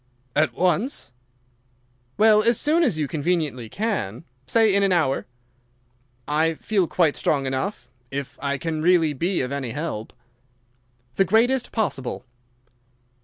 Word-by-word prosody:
"At 145 -5 +2
once?" 185 - 0 1.1
"Well, 215 0 +6
as 230 +1 +3
soon 315 +3 +2
as 240 - +2
you 150 -2 -1
conveniently 150 -6 -1
can. 190 - -3 0.2
Say 220 - +3
in 200 - +3
an 195 -1 +2
hour." 155 -9 +1 1.0
"I 160 +2 +1
feel 195 0 0
quite 165 -4 +2
strong 140 -2 0
enough, 130 - -3 0.2
if 135 -1 -6
I 140 0 -1
can 155 +2 -3
really 165 -2 +3
be 175 +7 -1
of 130 0 -3
any 140 -3 -3
help." 145 -7 -4 1.1
"The 195 - +4
greatest 240 +6 +2
possible." 135 - -2
165 Hz, 130 wpm, -23 LUFS, 140-205 Hz, 1.1 s, Well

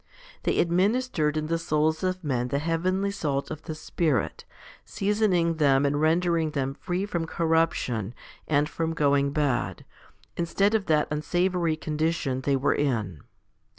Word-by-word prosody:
They - - +1
administered 180 -3 +1
in 155 - -1
the 165 +1 -1
souls 155 0 +1
of 185 0 -2
men 125 -4 -1
the 140 - -1
heavenly 180 +6 0
salt 145 -8 -2
of 155 -1 -6
the 160 -1 -6
Spirit, 155 -2 -1 0.4
seasoning 195 -5 +1
them 140 -2 +3
and 145 +1 +1
rendering 165 0 +2
them 135 -3 -2
free 180 +6 -3
from 170 -5 -3
corruption 160 - 0 0.3
and 145 -1 +2
from 165 0 -3
going 140 -2 +2
bad, 130 - -1 0.5
instead 195 +5 +1
of 215 -3 0
that 155 -2 +3
unsavoury 175 +2 0
condition 155 -4 -1
they 140 +1 +1
were 135 +1 +2
in. 110 - -1
155 Hz, 145 wpm, -26 LUFS, 140-175 Hz, 0.5 s, them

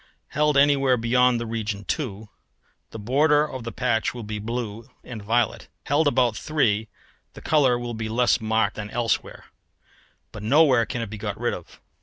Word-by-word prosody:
Held 150 0 +1
anywhere 140 -2 +4
beyond 125 +1 +3
the 115 - -4
region 110 -3 -4
2, 110 -8 -4 0.6
the - - -9
border 145 +7 +2
of 130 -4 -7
the 115 - -5
patch 120 -2 -1
will 120 - -6
be 105 0 -5
blue 115 0 -5
and 115 -4 -8
violet. 115 +2 0 0.2
Held 145 +2 +2
about 125 -5 +2
3 110 -7 0 0.5
the - - -12
colour 135 -6 +3
will 120 0 -5
be 110 -1 -4
less 120 +1 +2
marked 110 -1 0
than 105 -1 -5
elsewhere, 115 0 -2 0.9
but 105 - -9
nowhere 130 0 +4
can 120 +2 -3
it 110 - -7
be 105 - -7
got 105 0 -4
rid 120 0 0
of. 90 - -10
120 Hz, 175 wpm, -24 LUFS, 110-130 Hz, 0.9 s, anywhere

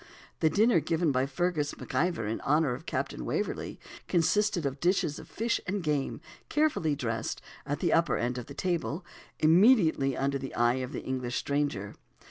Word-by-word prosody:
The 160 - +4
dinner 210 0 +4
given 160 +1 +1
by 130 0 +1
Fergus 150 +1 -1
MacIvor, 170 -9 -1
in 110 - -3
honour 150 -2 +2
of 135 +7 -8
Captain - - -3
Waverley, - - -3 0.3
consisted 185 0 +2
of 135 0 -2
dishes 175 -3 +1
of - - -12
fish 230 +1 -1
and 195 0 -2
game, 150 -2 -1 0.3
carefully 295 - +1
dressed, 115 -4 -3 0.3
at 145 +1 -2
the - - +2
upper 165 +1 +3
end 125 +1 -1
of 120 - -8
the 140 - -9
table, 175 -1 -2 0.3
immediately 160 - +4
under 140 0 0
the 135 0 -6
eye 120 +1 +3
of 130 +1 -5
the - - -5
English 125 -2 -3
stranger. 140 -9 -1
150 Hz, 170 wpm, -29 LUFS, 135-175 Hz, 0.3 s, The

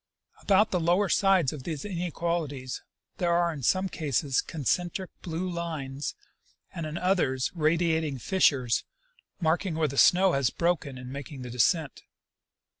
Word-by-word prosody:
About 205 +2 +3
the 180 - +1
lower 175 +4 +2
sides 190 -8 +3
of 150 - -7
these 150 +3 -5
inequalities 170 -7 -3 0.4
there 175 -1 +1
are 170 -1 +2
in 145 - -7
some 185 +9 +2
cases 145 -5 0
concentric 175 - -2
blue 170 +2 -3
lines 155 -6 -4 0.6
and 165 -2 -4
in 155 +2 -5
others 165 -9 +1
radiating 160 -2 +1
fissures, 130 -7 +2 0.6
marking 170 +1 0
where 160 -1 +1
the 140 -1 -1
snow 185 +1 +6
has 135 -5 +2
broken 165 -6 -1
in 125 0 -8
making 140 -1 -7
the 125 - -7
descent. 140 - +1
160 Hz, 140 wpm, -28 LUFS, 140-175 Hz, 0.6 s, snow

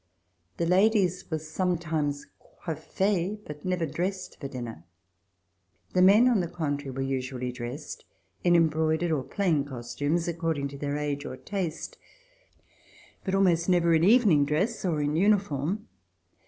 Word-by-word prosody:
The 170 - 0
ladies 185 0 +2
were 160 - -1
sometimes 155 -3 -2
coiffees, 195 0 -2
but 150 -1 -9
never 180 -2 0
dressed 185 +4 -4
for 140 - -5
dinner. 120 - -7 1.1
The 180 - +3
men, 205 +6 +7
on 240 -5 +3
the 175 - -1
contrary, 145 -5 -3
were 135 +1 -3
usually 130 -1 -3
dressed 125 +4 -7 0.4
in 175 -1 +4
em 165 -1 +5
broidered 160 +2 0
or 150 -4 +1
plain 165 -1 0
costumes, 145 +6 -2
according 165 -4 -1
to 140 - -9
their 145 0 -2
age 145 -1 -2
or 130 - -6
taste, 195 - -4 1.2
but 190 -1 -1
almost 180 -3 +3
never 170 -2 +4
in 160 0 +3
evening 200 - +5
dress 175 +11 0
or 165 -5 0
in 145 +1 0
uniform. 195 0 +1
165 Hz, 140 wpm, -27 LUFS, 145-185 Hz, 1.2 s, men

